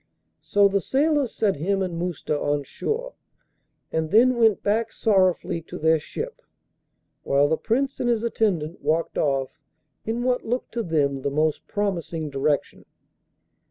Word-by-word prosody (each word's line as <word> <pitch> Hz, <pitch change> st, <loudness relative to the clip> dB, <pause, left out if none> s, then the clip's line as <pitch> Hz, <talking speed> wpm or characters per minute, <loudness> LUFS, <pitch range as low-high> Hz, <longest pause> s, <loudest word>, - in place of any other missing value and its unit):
So 205 Hz, 0 st, +4 dB
the 200 Hz, 0 st, 0 dB
sailors 285 Hz, -1 st, +1 dB
set 200 Hz, -7 st, 0 dB
him 195 Hz, +6 st, 0 dB
and 180 Hz, -2 st, -3 dB
Mousta 170 Hz, -3 st, -2 dB
on 145 Hz, 0 st, 0 dB
shore, 475 Hz, -, -4 dB, 0.8 s
and 160 Hz, -1 st, -1 dB
then 245 Hz, +7 st, +5 dB
went 225 Hz, -4 st, +3 dB
back 220 Hz, +2 st, +1 dB
sorrowfully 185 Hz, -5 st, +1 dB
to -, -, -7 dB
their 160 Hz, +1 st, +3 dB
ship, 460 Hz, -, -6 dB, 0.8 s
while 140 Hz, +1 st, +3 dB
the 160 Hz, -, +2 dB
Prince 265 Hz, +9 st, -1 dB
and 240 Hz, -, 0 dB
his 230 Hz, -2 st, +1 dB
attendant 185 Hz, -8 st, -1 dB
walked 165 Hz, +1 st, 0 dB
off 135 Hz, -3 st, -1 dB, 0.4 s
in 230 Hz, +2 st, -2 dB
what 250 Hz, 0 st, +1 dB
looked 245 Hz, +3 st, -3 dB
to 235 Hz, -, -2 dB
them 145 Hz, -7 st, 0 dB
the 140 Hz, -, -1 dB
most 155 Hz, +2 st, 0 dB
promising 170 Hz, -6 st, -2 dB
direction. 140 Hz, +1 st, -1 dB
190 Hz, 150 wpm, -24 LUFS, 155-230 Hz, 0.8 s, then